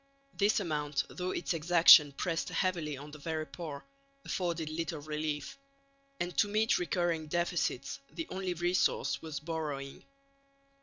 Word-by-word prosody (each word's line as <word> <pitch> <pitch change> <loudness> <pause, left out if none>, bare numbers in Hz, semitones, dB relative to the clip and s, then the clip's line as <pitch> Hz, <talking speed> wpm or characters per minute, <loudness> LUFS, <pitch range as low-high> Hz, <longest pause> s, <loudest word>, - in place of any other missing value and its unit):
This 205 +2 +2
amount, 150 -6 -1
though 180 0 -4
its 180 - -1
exaction 165 -2 +7
pressed 165 +3 -2
heavily 170 -6 -1
on 145 +2 -10
the 150 - -10
very 155 +1 -3
poor, 155 -4 -7 0.4
afforded 170 -3 -2
little 160 +1 -3
relief; 150 - -4 0.6
and 175 0 -3
to - - +5
meet 215 +2 +2
recurring 175 -3 -1
deficits 165 -5 -1
the 165 +1 -5
only 185 -1 -2
resource 175 +2 +1
was 155 -3 -5
borrowing. 150 -3 -5
165 Hz, 135 wpm, -32 LUFS, 150-175 Hz, 0.6 s, exaction